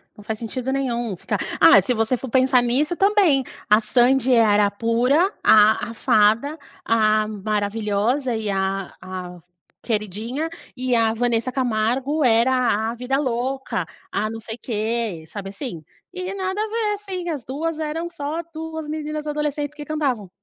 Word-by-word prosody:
não 210 - -13
faz 215 +1 -4
sentido 250 +3 -4
nenhum 240 -6 -1
ficar - - -3 0.2
ah, - - +8
se 250 - 0
você 225 +2 +1
for 260 +1 -7
pensar 260 +1 +4
nisso 280 +8 +1
também, 385 -8 +3 0.3
a 210 +1 +6
Sandy 250 +3 +3
era 210 -3 +4
pura, 245 - +2
a 215 +1 +5
a - - -7
fada, 225 +7 +2 0.3
a 215 -1 +3
maravilhosa 215 +4 -1
e 220 -1 -3
a 195 -1 -2
a 180 -1 -7 0.4
queridinha, 225 - -2 0.3
e 255 -1 0
a 225 -1 +3
Vanessa 235 +1 0
Camargo 255 +4 0
era 235 -2 +3
a - - -5
vida 250 +3 -1
louca, 260 - -2 0.3
a 215 +2 -1
não 225 0 -6
sei 220 0 -7
quê, 220 -6 -2
sabe 195 +2 -7
assim, 195 - -6 0.3
e 370 +1 -4
nada 380 0 -3
a 435 - -1
ver, 435 -1 -1
assim, 380 -4 -5
as 290 -7 -4
2 310 +4 -3
eram 320 +2 -3
só 315 -1 -4
2 320 0 -6
meninas 305 0 -4
adolescentes 295 -1 -2
que 295 -1 -8
cantavam. 270 -10 -2
245 Hz, 155 wpm, -22 LUFS, 215-295 Hz, 0.4 s, ah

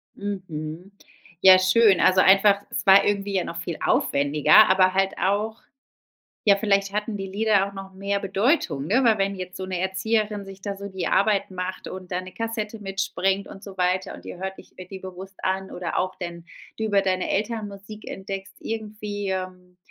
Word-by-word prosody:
Mhm. 180 -3 -6 0.5
Ja 185 -1 +9
schön. 190 +1 +4
Also 185 0 +5
einfach 200 +1 +5
es - - -3
war 195 +1 +7
irgendwie 200 -1 0
ja 185 - +2
noch 170 - -6
viel 170 -1 -4
aufwendiger, 145 +2 +4
aber 185 0 +4
halt 195 0 +1
auch 210 +3 0 0.8
ja, 200 -2 +6
vielleicht 200 -1 +1
hatten 210 0 -2
die 195 - -4
Lieder 200 0 +2
auch 200 - -13
noch 195 0 -9
mehr 200 +1 -2
Bedeutung, 195 - 0
ne, 255 +8 +2
weil 225 -3 +4
wenn 195 0 0
jetzt 185 0 -7
so 185 - -5
'ne 185 -1 -3
Erzieherin 210 +2 -1
sich 195 0 -11
da 200 -1 -4
so 200 +1 -7
die 190 -2 -4
Arbeit 200 -1 +2
macht 185 0 -5
und 185 -1 -9
da 180 +1 -2
'ne 185 - -11
Kassette 225 0 -4
mitbringt 195 0 -1
und 195 - -11
so 195 -1 -10
weiter 185 +1 0
und - - -12
ihr - - -8
hört 190 +1 -4
ich - - -15
äh, 185 - -8
die 190 0 -8
bewusst 190 +1 -10
an 190 0 -1
oder 175 -1 -3
auch 185 0 -1
denn 175 -2 -7 0.3
du 220 - -1
über 200 -2 +2
deine 185 -1 0
Eltern 215 +1 -1
Musik 200 +2 -10
entdeckst 195 0 -7
irgendwie 210 -2 -5
Ähm, 185 -1 -5
195 Hz, 195 wpm, -24 LUFS, 185-205 Hz, 0.8 s, Ja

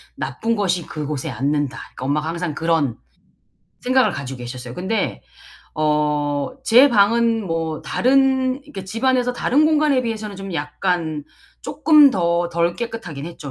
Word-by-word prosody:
나쁜 230 0 -2
것이 185 -5 0
그곳에 150 -3 -4
앉는다.' 140 0 -1
그러니까 125 - -9
엄마가 150 +3 0
항상 170 -1 -3
그런 160 -7 0 0.8
생각을 255 +1 +3
가지고 135 -2 -6
계셨어요. 125 0 -7
근데 190 - -2 0.5
어 150 -1 +1 0.5
제 255 +4 +7
방은 225 0 +3
뭐 165 -2 -3
다른 265 0 +2
이렇게 200 -11 -8
집안에서 250 +5 0
다른 285 +5 +2
공간에 300 -4 +3
비해서는 220 -3 -4
좀 195 -2 -7
약간 155 0 -2 0.4
쪼끔 300 -3 +5
더 170 -3 0
덜 170 0 0
깨끗하긴 175 -12 -6
했죠. 155 -4 -8
180 Hz, 305 characters per minute, -21 LUFS, 150-235 Hz, 0.8 s, 제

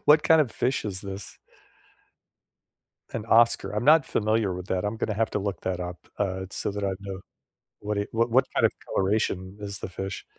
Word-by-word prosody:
What 150 +1 +6
kind 160 -1 +6
of 140 -6 +1
fish 125 +3 -1
is 95 -3 -3
this? 100 -1 -8 1.7
An 115 - -4
oscar. 115 0 +4
I'm 105 +3 -1
not 150 -1 +6
familiar 110 -3 +1
with 90 0 -6
that, 95 +1 0
I'm 105 +2 -1
gonna 110 - -1
have 110 +1 0
to - - +1
look 100 -1 -3
that 90 -1 -2
up, 90 0 -5 0.2
uh, 95 -2 -1
so 100 - -2
that 100 0 -3
I 95 - +1
know 95 -1 -6 0.6
what 105 0 -2
it 100 - -2
What 115 +1 +1
what 130 +2 +5
kind - - +4
of - - +4 0.2
coloration 95 -1 0
is 100 -1 -5
the - - -5
fish? 95 +2 -5
100 Hz, 200 wpm, -26 LUFS, 95-115 Hz, 1.7 s, What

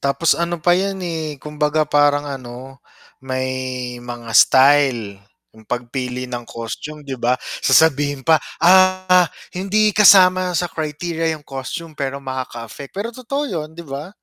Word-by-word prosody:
tapos 140 +4 +2
ano 170 0 -1
pa 175 - +5
'yan 195 +2 0
eh, 160 -3 -4
kumbaga 150 +2 -1
parang 145 0 +2
ano 130 -1 -9 0.4
may 130 -1 -4
mga 120 -1 -8
style 130 -5 +4 0.3
'yung 110 -1 -19
pagpili 125 +1 -4
ng 120 -1 -5
costume, 145 +6 -7
'di 135 - -4
ba? 125 +1 +2 0.3
Sasabihin 145 -3 +3
pa, 160 -1 +5 0.2
"Ah, 185 0 +4 0.3
hindi 210 +3 +1
kasama 185 -3 +6
sa 175 - 0
criteria 160 +1 -3
'yung 155 -2 -6
costume" 140 +4 -7
pero 140 -1 -4
makaka-affect. 130 -1 -7
Pero 210 +3 -3
totoo 275 +4 -3
'yun, 160 - -4
'di 170 - -9
ba? 140 +5 -6
145 Hz, 140 wpm, -19 LUFS, 130-170 Hz, 0.4 s, kasama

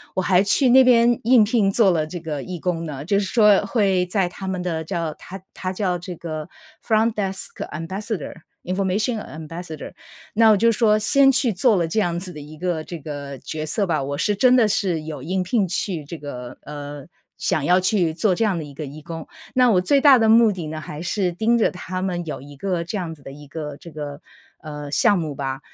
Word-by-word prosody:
我 185 - +1
还 185 0 +3
去 255 +6 +3
那 260 +2 +7
边 240 -1 +4
应 240 -1 +6
聘 210 -2 +2
做 205 -1 +4
了 155 -2 +1
这 175 +3 -6
个 155 -4 -5
义 180 -2 -6
工 170 -1 -2
呢。 140 -2 -6
就 200 +4 +1
是 200 - -1
说 210 -1 +4
会 195 -4 +1
在 180 0 0
他 190 +1 -8
们 185 -1 -2
的 165 -3 -2
叫 165 -2 -3
它 190 +1 -10
它 185 0 -4
叫 185 -2 -1
这 180 +1 -7
个 155 -1 -6 0.4
front 220 0 +3
desk 195 -2 -3 0.2
ambassador，information 190 - -3 0.3
ambassador。 165 -2 -8 0.4
那 225 0 +6
我 210 - +5
就 230 +3 +4
说 215 -2 +3
先 270 +5 +5
去 250 -2 +2
做 215 +4 +3
了 170 -3 +1
这 215 +7 0
样 175 -3 0
子 180 0 -6
的 150 - -9
一 150 +2 -10
个 175 -3 -2
这 170 0 -7
个 140 -2 -7
角 155 0 -5
色 195 +5 -1
吧， 155 -5 0
我 140 +1 -3
是 210 -1 +1
真 255 +4 +5
的 230 -4 +5
是 195 -6 0
有 150 -4 -7
应 185 +3 -1
聘 190 +1 +1
去 175 -4 -3
这 165 +3 -7
个 125 -4 -8
呃， 145 -1 -8 0.3
想 155 - 0
要 180 +4 +4
去 185 -3 +1
做 185 +4 +1
这 225 - 0
样 200 -5 +1
的 160 - -4
一 145 -1 -10
个 150 +2 -6
义 150 +3 -10
工。 165 -1 -7 0.3
那 250 -1 +4
我 180 -3 +4
最 280 +8 +3
大 280 -3 +8
的 225 - +3
目 225 -1 +6
的 175 -5 -5
呢， 155 0 -5
还 150 +1 -7
是 180 +1 -1
盯 220 +7 +1
着 225 - +3
他 185 0 -5
们 175 -2 -2
有 150 - -5
一 145 +1 -12
个 180 +2 -2
这 175 +5 -4
样 170 -3 -4
子 150 - -16
的 135 - -9
一 145 +1 -12
个 150 -1 -6
这 170 - -12
个， 145 0 -7 0.4
呃， 150 -2 -7
项 205 +6 +3
目 155 -4 -4
吧， 135 -1 -3
180 Hz, 325 characters per minute, -22 LUFS, 155-210 Hz, 0.4 s, 大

